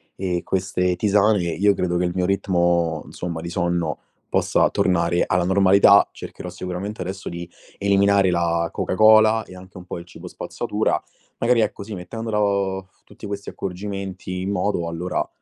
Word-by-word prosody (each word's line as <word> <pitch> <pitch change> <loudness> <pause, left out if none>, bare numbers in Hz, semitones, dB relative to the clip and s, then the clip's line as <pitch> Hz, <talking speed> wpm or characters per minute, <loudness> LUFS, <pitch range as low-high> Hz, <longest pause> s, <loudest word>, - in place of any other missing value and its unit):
e 90 -2 -2
queste 90 -1 0
tisane, 105 +2 +3
io 100 +4 +2
credo 90 -2 -1
che 90 - +1
il 90 - -1
mio 90 -1 +1
ritmo, 85 -4 +1
insomma, 85 -2 -5
di 85 - -6
sonno, 85 -2 -1 0.3
possa - - +2
tornare 85 -1 +2
alla 90 0 +2
normalità. 100 +2 +5
Cercherò 90 - -8
sicuramente 90 +3 -5
adesso 95 +1 -6
di 85 0 -6 0.3
eliminare 100 -1 +3
la 85 -1 0
Coca - - -2
Cola 110 +2 +6
e 90 - -12
anche 95 +1 -13
un 90 - -10
po' 85 - -6
il 85 - -11
cibo 90 - -11
spazzatura, - - -2 0.4
magari 120 0 +2
ecco, 105 -1 -2
sì, 105 +2 -8
mettendola 105 +4 -3
o 95 -2 -1
tutti - - -11
questi 100 0 -5
accorgimenti 95 -1 -5
in 95 - -3
moto, 100 -4 -1
allora 85 +2 -2
95 Hz, 165 wpm, -22 LUFS, 90-100 Hz, 0.4 s, Cola